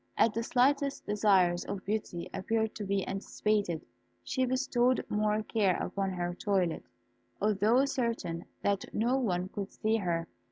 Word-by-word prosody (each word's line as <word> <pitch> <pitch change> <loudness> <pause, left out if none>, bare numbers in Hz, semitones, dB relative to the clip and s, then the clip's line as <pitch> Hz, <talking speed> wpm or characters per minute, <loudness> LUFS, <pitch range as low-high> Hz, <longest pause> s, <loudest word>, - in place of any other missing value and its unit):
As 230 - +5
the 225 +2 -2
slightest 275 +4 +1
desires 195 -4 +3
of 195 - -5
Beauty 200 -4 -3
appeared 220 +2 0
to 215 - -5
be 195 -1 -1
anticipated, 195 -3 -1 0.4
she 260 -1 0
bestowed 255 -1 +2
more 210 0 +1
care 205 -5 +1
upon 195 -1 -2
her 175 -1 -2
toilet, 185 -3 0 0.6
although 215 +5 +3
certain 230 -11 -2 0.2
that 200 -1 +1
no 245 +5 +2
one 185 -6 -1
could 200 0 -5
see 220 +1 +1
her. 170 -4 -1
210 Hz, 145 wpm, -31 LUFS, 185-230 Hz, 0.6 s, As